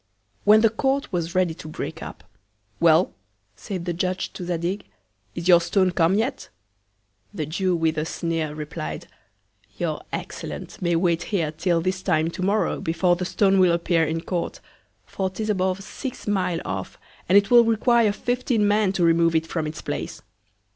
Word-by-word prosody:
When 215 +1 +7
the 225 -1 +4
Court 270 +3 -1
was 170 -1 -2
ready 180 -3 +2
to 160 - -10
break 155 - -6
up, - - -9 0.6
Well! 165 +2 +4 0.4
said 185 - -6
the 175 - -1
Judge 185 +2 -2
to - - -7
Zadig, 175 +3 -2 0.5
is 170 0 -4
your 175 -2 +7
Stone 185 +1 +2
come 170 +2 +2
yet? 240 +6 -2 0.8
The 160 -7 -3
Jew, 180 +4 0
with 160 -2 0
a 155 - -1
Sneer, 165 -2 -2
replied, 145 - -5 0.7
your - - -2
Excellence - - -6
may 175 -1 +1
wait 170 0 +2
here 170 -7 0
till 165 +2 0
this 185 +2 -1
Time 160 -2 +1
To 185 - -7
morrow, 200 +3 +1
before 175 +2 +2
the 180 +1 -3
Stone 195 +1 +2
will 180 -2 +5
appear 170 -1 +2
in 160 +1 -1
Court; 175 0 -3 0.5
for 190 -1 -2
'tis 215 +3 -2
above 190 0 -1
six 260 +5 -7
Mile 180 -4 0
off, 95 0 -5 0.3
and 190 - +7
it 200 +2 +3
will 240 -1 +8
require 230 0 +3
fifteen 245 -1 0
Men 205 -1 +3
to 185 - 0
remove 165 0 +3
it 160 0 +2
from 160 -1 -3
its 155 0 -7
Place. - - -5
180 Hz, 175 wpm, -24 LUFS, 165-200 Hz, 0.8 s, will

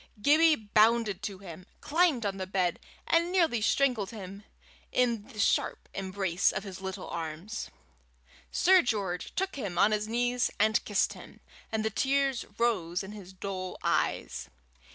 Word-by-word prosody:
Gibbie 310 +7 +5
bounded 215 -2 +2
to 200 -1 -4
him, 185 -2 -11
climbed 310 -7 +2
on 195 -1 -2
the 190 -1 -4
bed, 185 -2 0 0.3
and 340 +1 +2
nearly 330 - +2
strangled 240 -3 +2
him 200 -2 -9 0.5
in 235 -4 +1
the 255 -5 -14
sharp 205 - +1
embrace 190 -2 0
of 190 - -4
his 190 -2 -8
little 190 -1 -5
arms. 165 +7 -5 0.8
Sir 375 0 +5
George 200 - -2
took 380 -4 -2
him 195 -9 -4
on 210 - +5
his 215 0 0
knees 245 +2 +1
and 215 +2 +3
kissed 205 - +1
him, - - -13 0.3
and 220 -1 -1
the 220 - 0
tears 275 +1 +1
rose 185 -8 0
in 190 - -8
his 200 -3 -10
dull 185 -1 -5
eyes. 65 +2 -1
210 Hz, 155 wpm, -29 LUFS, 190-245 Hz, 0.8 s, Gibbie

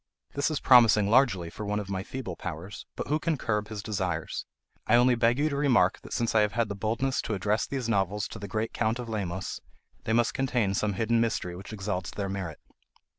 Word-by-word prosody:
This 140 +2 +1
is 155 - -1
promising 110 -5 +6
largely 110 -10 +3
for 110 - -7
one 105 0 -1
of 105 - -5
my 95 -1 -1
feeble 105 -3 -6
powers; 90 +4 -7
but - - -4
who 150 +1 +2
can 160 -1 0
curb 105 -4 -1
his 105 -2 -6
desires? 95 -6 -3 0.4
I 110 - +5
only 125 +1 +5
beg 120 +1 +3
you 150 +2 +2
to 140 - -3
remark 140 -3 +3
that - - -12
since 115 -1 0
I 110 - +5
have 105 -1 +1
had 115 -2 0
the 100 - -3
boldness 115 +6 0
to 110 - -2
address 105 +4 0
these 130 -4 -3
novels 100 -1 0
to 110 - -8
the 100 - -6
great 110 +3 -2
Count 110 +1 0
of 120 -2 -6
Lemos, 95 -4 -3 0.4
they 110 - 0
must 120 0 +2
contain 125 -7 0
some 105 +1 0
hidden 115 +3 +1
mystery 105 -6 -1
which 95 +4 -9
exalts 95 -4 -3
their 100 -1 -4
merit. 95 -6 -4
110 Hz, 225 wpm, -28 LUFS, 100-120 Hz, 0.4 s, promising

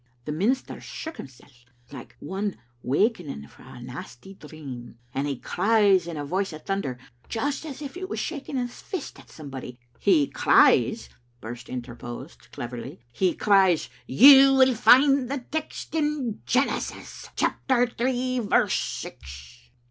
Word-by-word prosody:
"The - - -3
minister 215 - -1
shook 320 0 -7
himsel' 130 -3 -11 0.4
like 135 -4 -10
one 195 +5 -3 0.3
wakening 145 - -1
frae - - -18
a - - -11
nasty 190 +11 -9
dream, 140 -9 -10 0.2
and 140 +2 -1
he 140 -2 -3
cries 200 - +2
in 165 -2 -5
a 145 - -4
voice 190 +5 -1
of 155 - -10
thunder, 195 -11 -2 0.3
just 285 +6 -2
as 290 0 -7
if 275 - -7
he 365 - -7
was 375 - -5
shaking 285 -3 -4
his 245 -1 -4
fist 370 -7 -6
at - - -17
somebody 135 -5 -9
" 120 - -35
"He 155 -7 +5
cries," - - +3 0.3
Birse 120 +2 -8
interposed, 120 +3 -8
cleverly, 120 0 -7
"he 180 +8 +1
cries, 190 -5 +3 0.2
•You 270 - +8
will 260 -1 +6
find 260 +2 +5
the 270 -3 -4
text 315 0 -5
in 295 -8 -1
Genesis, 265 +3 -2
chapter 250 -2 +1
three, 255 +1 -1
verse 215 -4 +2
six.'" 65 -2 -6
195 Hz, 145 wpm, -25 LUFS, -, 0.4 s, You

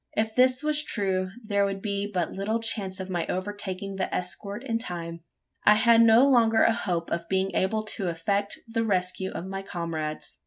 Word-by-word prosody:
If 220 0 0
this 255 +3 +3
was 300 0 +2
true, 190 -6 -1 0.2
there 200 -1 +2
would 195 0 -1
be 200 0 -2
but 180 -4 -1
little 210 +4 -1
chance 205 -4 -4
of 190 - -5
my 175 -2 -1
overtaking 195 0 -4
the 190 - -2
escort 200 +5 -3
in 230 -4 -1
time. 170 -6 -6 0.4
I 210 - +7
had 230 +1 +5
no 230 +4 +7
longer 230 -4 +4
a 230 - +4
hope 175 -6 -2
of 170 0 -3
being 190 0 0
able 215 +5 +1
to 210 -3 -2
effect 200 +5 -1
the 230 0 -1
rescue 190 -2 0
of 175 - -6
my 195 0 -4
comrades. 160 - -5
200 Hz, 190 wpm, -27 LUFS, 185-225 Hz, 0.4 s, I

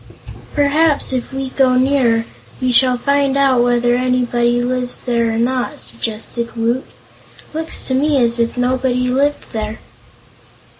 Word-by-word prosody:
"Perhaps, 290 0 +2
if 255 0 -3
we 270 0 -4
go 260 -2 +2
nearer, 255 -3 +2 0.3
we 255 -1 0
shall 250 0 +4
find 280 +1 +1
out 270 -3 +3
whether 240 0 +2
anybody 245 -1 +1
lives 250 0 -1
there 235 -2 0
or 225 - -2
not," 250 +2 -1
suggested 215 - -4
Woot. 235 +3 -1 0.7
"Looks 320 +1 -2
to 260 - -3
me 285 +2 +2
as 235 -2 +2
if 235 +1 -1
nobody 250 0 0
lived 280 +3 -1
there." 215 -1 -4
250 Hz, 140 wpm, -17 LUFS, 235-270 Hz, 0.7 s, shall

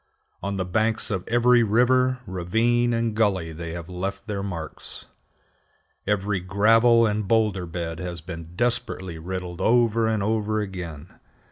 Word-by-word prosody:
On 100 +1 -3
the 95 - -1
banks 110 +5 0
of 95 -3 -3
every 120 +1 +4
river, 125 +3 +3
ravine, 115 +6 +1
and 115 -1 0
gully 95 -7 +1
they 85 +1 -6
have 85 -2 -7
left 95 +2 -5
their 100 -2 -3
marks. 85 -5 -7 1.0
Every 100 -1 0
gravel 115 +5 +4
and 105 -2 -1
boulder 105 -5 +1
bed 85 -1 -5
has 90 -2 -5
been 85 0 -9
desperately 110 -7 -1
riddled 90 +1 -5
over 115 0 +3
and 110 -2 0
over 110 0 0
again. 90 -6 -7
100 Hz, 140 wpm, -24 LUFS, 90-115 Hz, 1.0 s, every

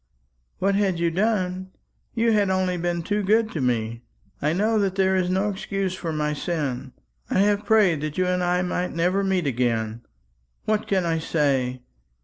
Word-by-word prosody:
"What 195 +1 +1
had 195 -3 +1
you 170 0 +1
done! 185 -1 0 0.5
You 230 0 +2
had 205 -3 +2
only 185 -1 +1
been 175 -1 -2
too 205 +4 0
good 215 +3 +2
to 155 - -3
me. 115 -2 -1 0.4
I 150 - +1
know 215 +6 +1
that 195 -2 0
there 190 -1 +2
is 185 -1 +1
no 190 +3 +1
excuse 195 -1 -3
for 175 -3 -4
my 150 -1 -1
sin. 150 -5 -3 0.4
I - - 0
have 205 0 +2
prayed 200 -9 +4
that 150 -1 -4
you 185 - +2
and 180 0 0
I 180 +1 +1
might 180 0 -2
never 180 +4 +1
meet 190 -3 0
again. 115 -3 -1 0.6
What 215 -1 0
can 190 -3 +1
I 165 -1 0
say? 135 -6 0
180 Hz, 180 wpm, -24 LUFS, 155-195 Hz, 0.6 s, prayed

